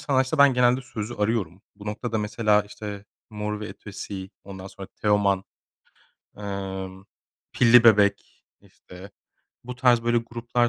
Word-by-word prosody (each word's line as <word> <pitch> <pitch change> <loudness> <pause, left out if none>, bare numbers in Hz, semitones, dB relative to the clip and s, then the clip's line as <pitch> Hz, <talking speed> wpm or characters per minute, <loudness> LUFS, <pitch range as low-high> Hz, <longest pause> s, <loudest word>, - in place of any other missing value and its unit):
sanatçıda 130 +1 0
ben 140 -2 +6
genelde 125 +1 +3
sözü 120 -2 -6
arıyorum. 105 -5 -1
Bu 105 0 -12
noktada 110 +2 -3
mesela 105 0 +2
işte 105 -1 -8 0.3
Mor 105 0 -4
ve 105 - -5
Ötesi, 100 -2 -8
ondan 95 -1 -9
sonra 95 0 -10
Teoman, 100 -2 +2 0.9
emm, 95 -2 -6 0.5
Pilli 120 -1 +6
Bebek, 105 -3 +3 0.2
işte, 95 +3 -14 0.5
bu 125 0 -7
tarz 120 -2 +4
böyle 120 0 +3
gruplar, 120 +1 -1
105 Hz, 130 wpm, -25 LUFS, 100-120 Hz, 0.9 s, ben